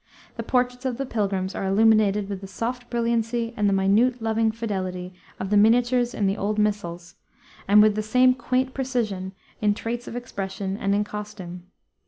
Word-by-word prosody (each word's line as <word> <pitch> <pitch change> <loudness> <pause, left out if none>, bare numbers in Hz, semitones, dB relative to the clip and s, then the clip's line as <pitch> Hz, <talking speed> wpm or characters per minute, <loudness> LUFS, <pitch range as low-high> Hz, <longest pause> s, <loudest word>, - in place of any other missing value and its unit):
The - - -4
portraits 250 0 0
of 255 -3 -2
the 275 - -2
pilgrims 195 -5 -1
are 195 - -3
illuminated 210 0 +3
with 200 -2 -5
the 195 - -8
soft 240 +5 -4
brilliancy 235 0 -1
and 205 -1 +2
the - - +1
minute 210 +6 +3
loving 225 0 +1
fidelity 185 -5 -4 0.3
of 190 - -4
the 210 - +4
miniatures 240 +3 +3
in 205 - 0
the 195 +2 +1
old 210 +2 -1
missals, 185 -4 -2 0.5
and 210 +2 +7
with 215 -1 +4
the 215 - -1
same 250 +4 +4
quaint 255 +1 -1
precision 220 -8 -2 0.3
in 210 -1 +2
traits 235 +2 -4
of - - -7
expression 195 -5 -4
and 200 -1 0
in 205 - +2
costume. 205 -4 -8
215 Hz, 180 wpm, -24 LUFS, 195-240 Hz, 0.5 s, and